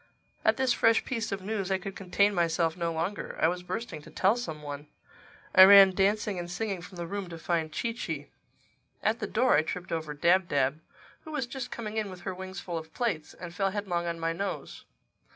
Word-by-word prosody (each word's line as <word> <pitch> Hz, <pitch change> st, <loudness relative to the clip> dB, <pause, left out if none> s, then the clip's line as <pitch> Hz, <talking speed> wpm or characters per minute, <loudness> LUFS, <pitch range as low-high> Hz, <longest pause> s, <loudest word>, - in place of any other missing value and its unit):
At -, -, +3 dB
this 260 Hz, -2 st, +2 dB
fresh 225 Hz, 0 st, +3 dB
piece 230 Hz, -4 st, -3 dB
of 195 Hz, -1 st, -3 dB
news 200 Hz, -2 st, -2 dB
I 190 Hz, -, +2 dB
could 195 Hz, 0 st, -7 dB
contain 200 Hz, +2 st, +2 dB
myself 165 Hz, -2 st, +1 dB
no 170 Hz, -2 st, -1 dB
longer. 170 Hz, +4 st, -3 dB
I -, -, +4 dB
was 180 Hz, +1 st, -1 dB
bursting 180 Hz, -2 st, -5 dB
to -, -, -13 dB
tell 195 Hz, +4 st, +2 dB
some 160 Hz, -11 st, -5 dB
one. 145 Hz, 0 st, -7 dB, 0.7 s
I 185 Hz, -, +10 dB
ran 195 Hz, -1 st, +9 dB
dancing 200 Hz, 0 st, +1 dB
and 175 Hz, 0 st, -5 dB
singing 195 Hz, 0 st, -3 dB
from 180 Hz, +1 st, -11 dB
the 170 Hz, -1 st, -4 dB
room 195 Hz, +1 st, -5 dB
to 165 Hz, -, -7 dB
find 165 Hz, -1 st, -1 dB
Chee 230 Hz, +8 st, -2 dB
Chee. 235 Hz, -, -5 dB, 0.8 s
At 220 Hz, +2 st, +1 dB
the -, -, -3 dB
door 245 Hz, +3 st, +3 dB
I -, -, +5 dB
tripped 180 Hz, +3 st, -5 dB
over 155 Hz, -2 st, -3 dB
Dab 175 Hz, +4 st, +3 dB
Dab, 140 Hz, +1 st, +1 dB, 0.4 s
who 315 Hz, -, -9 dB
was 295 Hz, -4 st, -1 dB
just 245 Hz, 0 st, -6 dB
coming 220 Hz, -2 st, -5 dB
in 215 Hz, -2 st, -1 dB
with 185 Hz, -1 st, -10 dB
her 190 Hz, -, -4 dB
wings 185 Hz, 0 st, -7 dB
full 170 Hz, -2 st, -4 dB
of 160 Hz, 0 st, -13 dB
plates, 225 Hz, -11 st, -2 dB
and 175 Hz, -2 st, -8 dB
fell 195 Hz, +2 st, +1 dB
headlong 190 Hz, -4 st, -2 dB
on 170 Hz, 0 st, -3 dB
my 165 Hz, 0 st, 0 dB
nose. 195 Hz, +4 st, -5 dB
185 Hz, 220 wpm, -29 LUFS, 170-210 Hz, 0.8 s, I